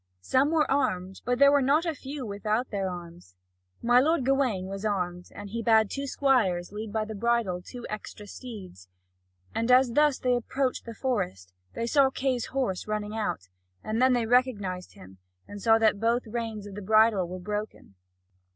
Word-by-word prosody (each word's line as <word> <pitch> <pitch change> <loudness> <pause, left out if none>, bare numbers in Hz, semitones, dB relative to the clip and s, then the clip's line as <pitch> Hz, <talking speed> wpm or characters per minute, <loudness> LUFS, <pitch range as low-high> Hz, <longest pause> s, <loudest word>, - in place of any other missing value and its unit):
Some 265 - +2
were 315 -1 +3
armed, 190 -9 -1
but 245 0 +1
there 280 +1 +7
were 285 0 +4
not 290 +6 +2
a 330 - 0
few 275 -1 -7
without 215 +4 -2
their 195 -2 -1
arms. 170 - -10 0.5
My 245 +1 +5
lord 300 0 +2
Gawain 260 -8 +1
was 195 +1 -6
armed, 180 -4 -2
and 205 -1 -8
he 230 +1 -3
bade 220 -2 +3
two 280 0 -3
squires 220 -12 +1
lead 210 +1 -6
by 215 0 -1
the 220 - -6
bridle 215 -4 0
two 240 +6 -9
extra 210 0 -7
steeds. 200 - -10 0.7
And 230 +2 0
as 255 0 +6
they - - -6
thus 295 0 +3
approached 250 +2 0
the 230 -1 -8
forest, 95 - -3 0.2
they 230 - -2
saw 275 +2 +4
Kay's 260 -2 -1
horse 250 -10 -2
running 210 0 -3
out; 210 - -3 0.3
and 220 +2 -2
they 250 -2 +3
recognised 215 -7 0
him, 95 0 -15 0.3
and 205 0 -9
saw 225 +1 +5
that 220 -2 +2
both 235 +3 +1
reins 225 -2 -4
of 205 - -9
the 205 - -7
bridle 215 -2 +4
were 180 +1 -6
broken. 210 - -6
220 Hz, 180 wpm, -27 LUFS, 195-255 Hz, 0.7 s, there